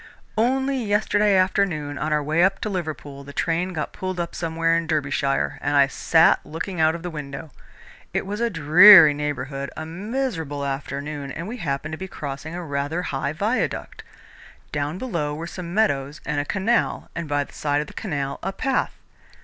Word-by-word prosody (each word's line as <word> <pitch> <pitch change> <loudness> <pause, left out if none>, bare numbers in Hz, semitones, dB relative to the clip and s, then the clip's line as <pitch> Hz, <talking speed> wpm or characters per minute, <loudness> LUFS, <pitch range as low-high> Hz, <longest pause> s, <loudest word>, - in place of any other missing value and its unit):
"Only 265 +3 +1
yesterday 210 -1 +2
afternoon, 180 -6 +1
on 155 - -2
our 150 -1 +2
way 155 +4 +2
up 195 +1 +2
to 215 - -2
Liverpool, 155 -6 -5
the 140 0 -11
train 170 +4 0
got 155 -4 -4
pulled 185 -1 -4
up 170 0 -3
somewhere 165 0 0
in 165 -1 -1
Derbyshire, 140 -3 0
and 145 0 +1
I 140 - +7
sat 160 +4 +3
looking 160 +3 -4
out 160 +1 +4
of 170 - -8
the 175 - -4
window. 150 0 -7 0.6
It - - -1
was 205 +3 -4
a 235 - +2
dreary 165 0 +9
neighbourhood, 140 -1 -3
a 160 - -4
miserable 170 - -3
afternoon, 140 +1 -4
and 165 +6 -6
we 240 +4 -5
happened 150 - -3
to 160 - -5
be 190 - -5
crossing 150 0 -6
a 180 - -5
rather 145 +4 -2
high 140 -1 -2
viaduct. 210 +10 -2 0.7
Down 145 +3 -2
below 170 -11 -2
were 160 +2 -5
some 170 0 -7
meadows 150 -8 0
and 150 -1 -1
a 145 - -1
canal, 205 +8 0
and 170 -2 -4
by 145 0 +1
the - - -16
side 145 -1 0
of - - -4
the - - -13
canal, 145 -9 -3
a 190 - -2
path. 265 +7 -1
160 Hz, 185 wpm, -23 LUFS, 145-190 Hz, 0.7 s, dreary